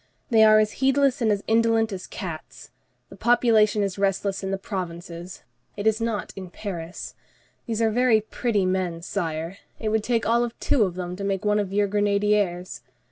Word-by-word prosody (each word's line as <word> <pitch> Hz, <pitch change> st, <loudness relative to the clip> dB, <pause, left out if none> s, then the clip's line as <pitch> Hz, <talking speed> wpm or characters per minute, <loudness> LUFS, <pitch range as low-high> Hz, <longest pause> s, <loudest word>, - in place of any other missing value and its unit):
They 220 Hz, -1 st, +6 dB
are 215 Hz, 0 st, +7 dB
as 215 Hz, 0 st, +3 dB
heedless 270 Hz, 0 st, +3 dB
and 220 Hz, -2 st, +3 dB
as 205 Hz, -1 st, -1 dB
indolent 225 Hz, -1 st, +2 dB
as 185 Hz, -1 st, -6 dB
cats. 170 Hz, -5 st, -8 dB, 0.4 s
The -, -, -12 dB
populace 230 Hz, -3 st, +3 dB
is 200 Hz, -2 st, -1 dB
restless 195 Hz, 0 st, 0 dB
in 190 Hz, -, -2 dB
the 195 Hz, -, -1 dB
provinces; 175 Hz, -2 st, -6 dB, 0.3 s
it 205 Hz, -, -4 dB
is 220 Hz, +1 st, +2 dB
not 225 Hz, -2 st, -2 dB
in 185 Hz, -2 st, -8 dB
Paris. 175 Hz, -3 st, -6 dB, 0.5 s
These 230 Hz, -1 st, -1 dB
are 220 Hz, -, +3 dB
very 240 Hz, -1 st, +4 dB
pretty 215 Hz, -2 st, -1 dB
men, 185 Hz, -3 st, -1 dB
Sire. 165 Hz, -1 st, -3 dB, 0.2 s
It 220 Hz, -, -2 dB
would 220 Hz, 0 st, +1 dB
take 230 Hz, -1 st, 0 dB
all 235 Hz, +2 st, +3 dB
of 240 Hz, -1 st, -5 dB
two 225 Hz, -6 st, +2 dB
of 180 Hz, -2 st, -4 dB
them 180 Hz, -1 st, -4 dB
to 200 Hz, -, -5 dB
make 195 Hz, 0 st, -2 dB
one 210 Hz, 0 st, +3 dB
of 200 Hz, -2 st, -2 dB
your 205 Hz, +1 st, +2 dB
grenadiers. 200 Hz, -6 st, 0 dB
205 Hz, 190 wpm, -24 LUFS, 185-225 Hz, 0.5 s, are